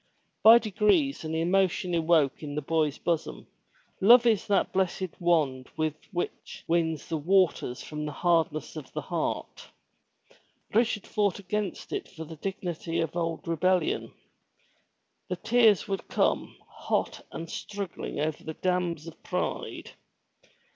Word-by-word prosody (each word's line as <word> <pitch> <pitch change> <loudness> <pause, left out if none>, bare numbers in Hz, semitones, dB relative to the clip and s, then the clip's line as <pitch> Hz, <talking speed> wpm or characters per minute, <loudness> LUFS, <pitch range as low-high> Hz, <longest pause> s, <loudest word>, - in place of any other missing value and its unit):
By 225 +2 +10
degrees 220 - +2
an 160 0 -3
emotion 180 +1 +1
awoke 160 -4 +2
in 145 -2 -6
the 150 - -1
boy's 155 -1 +1
bosom. 165 -2 -2 0.5
Love 235 +5 +7
is 220 -5 +2
that 200 - +1
blessed 185 -1 0
wand 150 -7 +1
which 155 -1 -3 0.6
wins 165 -2 0
the 165 - -1
waters 165 -6 +1
from 150 0 -5
the - - -4
hardness 165 0 0
of 150 -5 -8
the - - -3
heart. - - -3 1.1
Richard 225 -2 +2
fought 205 -3 0
against 205 0 -4
it 400 -2 -3
for 160 -3 -9
the 160 0 -10
dignity 170 -2 -3
of 165 0 -2
old 165 -1 -2
rebel 185 +3 +3
lion. 170 - -3 1.2
The 180 - -1
tears 225 +2 +4
would 195 -1 -3
come, - - 0 0.3
hpt - - 0
and 165 - -6
struggling 200 -5 -5
over 155 +1 -2
the 160 - -6
dams 180 -4 -1
of 165 - -11
pride. - - -3
170 Hz, 135 wpm, -28 LUFS, 160-195 Hz, 1.2 s, By